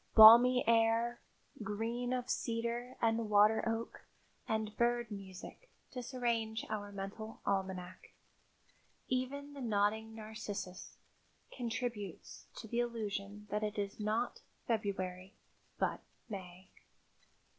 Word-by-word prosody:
Balmy 235 +3 +10
air, 230 +1 +3 0.4
green 225 +3 -2
of 250 -1 -1
cedar 235 +1 -2
and 225 -1 +2
water 210 +1 +5
oak 225 0 -3 0.5
and 220 -1 -1
bird 240 -1 +1
music 195 - -9 0.2
disarrange 235 -3 -1
our 205 -1 -3
mental 200 +3 -6
almanac. 185 -2 -2 1.0
Even 280 +3 -2
the 280 - -8
nodding 220 0 +1
narcissus 210 -4 -6 0.6
contributes 230 -5 -4
to - - -8
the 235 +2 -1
illusion 210 -3 -3
that 210 +1 0
it 210 0 -2
is 200 0 -3
not 215 +3 -1 0.2
February, 190 -4 -2 0.4
but - - 0 0.3
May. 185 -3 -8
220 Hz, 100 wpm, -35 LUFS, 205-235 Hz, 1.0 s, Balmy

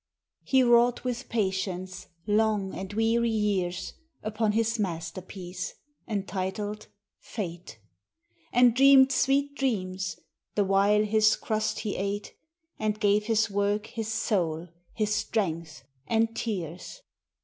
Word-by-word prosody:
Hb 260 -2 +4
wrought 240 0 +4
with 250 0 -4
patience 190 -3 -2 0.2
long 210 -2 +1
and 190 +1 -6
weary 225 +2 +2
years 195 -5 -1 0.3
Upon 215 0 0
his 230 +1 +1
masterpiece, 180 0 -5 0.3
entitled 205 0 -3 0.2
" - - -63
Fate," 175 - -6 0.7
And 245 -1 +5
dreamed 270 0 +7
sweet 275 +2 +2
dreams, 190 -9 -2 0.4
the 205 - +2
while 200 +2 +4
his 215 0 +4
crust 215 -1 -2
he 210 - -3
ate, 200 +2 -3 0.5
And 215 -1 0
<;ave 205 +1 +5
his 220 -2 +2
work 205 +1 0
his 225 -1 -5
soul, 175 -7 -1 0.3
his 215 -2 0
strength, 170 -9 -2 0.2
and 225 0 +1
tears. 185 - -5
210 Hz, 115 wpm, -27 LUFS, 190-225 Hz, 0.7 s, dreamed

